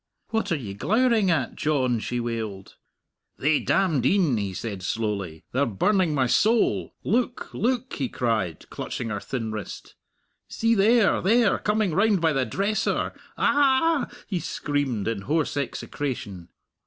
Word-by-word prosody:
"What 225 -4 -1
are - - +3
ye 115 -10 -5
glowering 220 - +2
at, 155 -7 0
John?" 130 -6 +1
she 120 +2 -3
wailed. 110 -5 -5 0.6
"Thae 150 +2 +3
damned 165 -10 +1
een," 165 -2 +3
he 100 -2 -2
said 100 0 -5
slowly, 100 -5 -3
"they're 140 +2 +1
burning 165 - +1
my 135 -2 +2
soul! 125 - +2
Look, 245 +3 -1
look!" 255 +1 -1
he 135 -4 -2
cried, 110 -9 -2
clutching 115 - -4
her 105 -1 -2
thin 115 -1 -4
wrist; 105 -3 -7 0.5
"see, 230 +1 +1
there, 220 +1 +4
there 225 +2 +3
coming 210 -4 0
round 200 +2 +3
by 160 -2 +2
the 135 -3 0
dresser! 210 - 0
A - - -29 0.2
ah!" 285 +2 +3 0.2
he 185 -4 -2
screamed, 145 -8 -2
in 115 -3 -2
hoarse 150 +8 0
execration. 120 -9 -4
145 Hz, 145 wpm, -25 LUFS, -, 0.6 s, there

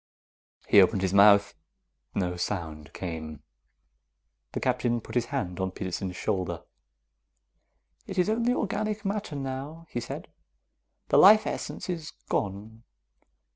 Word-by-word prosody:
He 100 - +8
opened 95 +1 +2
his 95 0 0
mouth. 100 0 +6 0.6
No 90 -2 -1
sound 80 -4 -4
came. 80 -4 -6 1.1
The - - -2
Captain 120 -2 0
put - - -11
his 120 -1 +1
hand 95 -10 -3
on 95 0 0
Peterson's 95 0 -4
shoulder. 95 -2 -2 1.4
"It 190 - -6
is 180 - +3
only 230 +3 +1
organic 215 -1 -2
matter, 200 -5 -2
now," 140 +4 -5
he 120 - -2
said. 120 - -7 0.8
"The - - +5
life 215 +3 +8
essence - - -4
is 165 -4 -4 0.2
gone." 105 +3 -3
110 Hz, 125 wpm, -28 LUFS, -, 1.4 s, He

